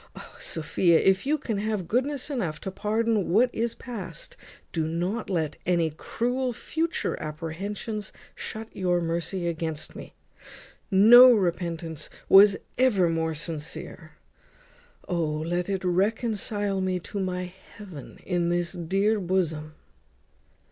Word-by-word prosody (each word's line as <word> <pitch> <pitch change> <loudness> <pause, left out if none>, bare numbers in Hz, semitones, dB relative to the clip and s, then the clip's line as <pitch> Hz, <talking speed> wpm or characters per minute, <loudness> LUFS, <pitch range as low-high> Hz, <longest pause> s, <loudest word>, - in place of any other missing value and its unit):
O - - -12
Sophia! 165 +2 +2
if 190 +5 +2
you 305 +2 +3
can 225 -8 -3
have 210 -4 -2
goodness 270 - -1
enough 175 - -2
to 190 - -4
pardon 215 0 0
what 240 +7 +3
is 230 +1 -1
past, 200 -10 -8 0.4
do 160 -2 0
not 180 +8 -2
let 160 -5 -1
any 170 -3 +2
cruel 245 - -2
future 325 +8 -2
apprehensions 190 +7 -4 0.2
shut 220 0 -7
your 180 -2 +1
mercy 170 +2 -2
against 160 -2 -4
me. - - -10 0.7
No 235 +6 +9
repentance 170 - -1 0.2
was 195 +1 +8 0.2
ever 205 -9 +4
more 160 -1 -1
sincere. 155 0 -6 0.9
O! 175 -2 0
let 165 +4 -1
it 195 -1 -1
reconcile 205 +1 0
me 185 -1 0
to 200 - -5
my 180 -1 -3 0.2
heaven 185 - -10
in 175 -2 0
this 175 0 0
dear 195 +5 +1
bosom." 165 -5 -1
185 Hz, 125 wpm, -26 LUFS, 170-215 Hz, 0.9 s, No